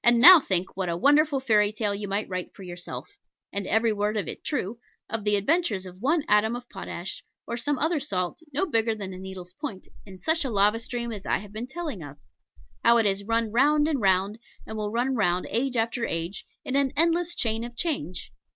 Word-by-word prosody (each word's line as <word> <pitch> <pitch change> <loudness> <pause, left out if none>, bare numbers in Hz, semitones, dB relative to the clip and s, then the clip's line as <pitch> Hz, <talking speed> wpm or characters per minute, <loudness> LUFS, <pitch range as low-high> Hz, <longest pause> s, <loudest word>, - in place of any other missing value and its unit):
And 240 0 +6
now 350 +7 +11
think 190 - -1
what 185 -2 -2
a 170 - -1
wonderful 290 - +4
fairy 210 -5 +3
tale 215 -1 -1
you 200 0 -4
might 200 +2 -1
write 185 -1 -5
for 195 - -11
yourself 175 -1 -8 0.3
and 200 -1 -2
every 225 0 +2
word 210 +1 -1
of 195 -6 -2
it - - -7
true 235 -6 -3 0.3
of 225 -1 -3
the 210 0 +3
adventures 210 - +1
of 185 +1 -11
one 300 +5 +2
atom 210 +3 +3
of 245 0 -8
Potash 175 +3 -6 0.2
or 235 - -4
some 280 +4 -1
other 315 +3 +1
Salt, 180 - -2
no 300 +8 +1
bigger 225 - +1
than 195 -3 -6
a 185 - -8
needle's 185 -1 -8
point, 220 -11 -5 0.2
in 190 -1 -11
such 320 - +1
a 270 - -2
lava 210 +1 +3
stream 235 0 -4
as 205 -3 -7
I - - +2
have 205 0 -11
been 225 +3 -4
telling 300 - -5
of. 145 -1 -9 0.7
How 235 0 +6
it 225 - +4
has 200 0 +2
run 230 +1 0
round 295 +5 +4
and 290 -6 0
round, 195 +2 +2 0.3
and 220 - -7
will 210 -1 -2
run 245 +4 0
round 180 -6 +1
age 250 +1 0
after 230 +1 0
age, 170 0 -3 0.2
in 265 - -2
an 275 -1 +3
endless 340 +2 +3
chain 225 -1 0
of 240 0 -8
change. 185 - -3
220 Hz, 220 wpm, -26 LUFS, 195-265 Hz, 0.7 s, now